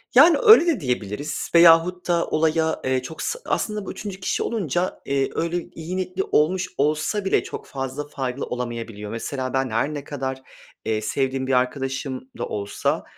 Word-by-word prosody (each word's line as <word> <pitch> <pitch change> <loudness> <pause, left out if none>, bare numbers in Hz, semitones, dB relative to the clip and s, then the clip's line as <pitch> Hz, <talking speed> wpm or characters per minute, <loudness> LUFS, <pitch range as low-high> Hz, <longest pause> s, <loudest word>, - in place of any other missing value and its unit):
Yani 315 +6 +8
öyle 430 -6 +8
de 315 -9 +2
diyebiliriz 125 - -3
veyahut 170 +2 +6
da 170 -1 +2
olaya, 160 0 +1
eee, 130 -1 +1
çok 145 +5 -8
sı 485 - -2
aslında 210 -2 -1
bu - - -5
3. 200 -2 -7
kişi 185 - -1
olunca, 185 - -1
eee, 135 -1 0
öyle 170 +1 -1
iyi 170 +3 -5
niyetli 185 +1 -2
olmuş 180 +4 +2
olsa 155 +8 0
bile 190 - +2
çok - - -7
fazla 135 +2 -4
faydalı 135 -2 -3
olamayabiliyor. 115 -4 -5
Mesela 130 +3 -4
ben 130 -1 +1
her 115 +7 0
ne 145 -2 -5
kadar, 130 -2 -4 0.4
eee, 110 -1 0
sevdiğim 130 +3 -1
bir 135 - +1
arkadaşım 130 +1 -1
da - - -2
olsa, 100 -1 -2
145 Hz, 170 wpm, -23 LUFS, 130-175 Hz, 0.4 s, Yani